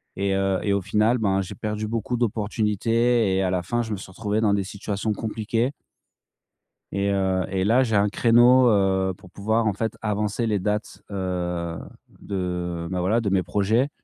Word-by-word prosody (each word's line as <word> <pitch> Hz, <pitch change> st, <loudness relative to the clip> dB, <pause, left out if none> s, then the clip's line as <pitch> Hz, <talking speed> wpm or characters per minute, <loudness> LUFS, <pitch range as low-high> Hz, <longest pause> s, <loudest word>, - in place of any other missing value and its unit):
et 100 Hz, 0 st, 0 dB
heu 95 Hz, -1 st, +1 dB
et 100 Hz, -, 0 dB
au 100 Hz, -, +1 dB
final, 110 Hz, +6 st, +2 dB
ben, 100 Hz, -4 st, +1 dB
j'ai 95 Hz, -, -7 dB
perdu 105 Hz, -1 st, -3 dB
beaucoup 115 Hz, +2 st, -2 dB
d'opportunités 115 Hz, 0 st, +1 dB
et -, -, +2 dB
à 95 Hz, -, +1 dB
la 90 Hz, -1 st, -1 dB
fin, 120 Hz, +6 st, -1 dB
je 110 Hz, -, -5 dB
me -, -, -3 dB
suis 95 Hz, -, -10 dB
retrouvé 105 Hz, +2 st, -2 dB
dans 105 Hz, -2 st, +3 dB
des 100 Hz, -, +1 dB
situations 100 Hz, +2 st, -3 dB
compliquées. 115 Hz, +4 st, -1 dB, 1.2 s
Et 100 Hz, 0 st, 0 dB
heu 95 Hz, -1 st, +1 dB
et 95 Hz, 0 st, 0 dB
là, 120 Hz, +5 st, +4 dB
j'ai 110 Hz, -4 st, -1 dB
un 100 Hz, +1 st, +3 dB
créneau, 120 Hz, +4 st, +5 dB
heu, 95 Hz, -2 st, +2 dB
pour 90 Hz, -, -16 dB
pouvoir, 110 Hz, +4 st, 0 dB
en 105 Hz, -, +1 dB
fait, 110 Hz, +3 st, -3 dB
avancer 105 Hz, +1 st, -1 dB
les 105 Hz, -3 st, +1 dB
dates 105 Hz, +2 st, -1 dB
s -, -, -33 dB
heu, 90 Hz, -3 st, -3 dB, 0.4 s
de, 90 Hz, -3 st, -3 dB
bah, 90 Hz, -1 st, -2 dB
voilà, 100 Hz, +6 st, +2 dB
de 110 Hz, -4 st, -1 dB
mes 95 Hz, -2 st, +2 dB
projets. 105 Hz, -, +1 dB
100 Hz, 190 wpm, -24 LUFS, 95-110 Hz, 1.2 s, créneau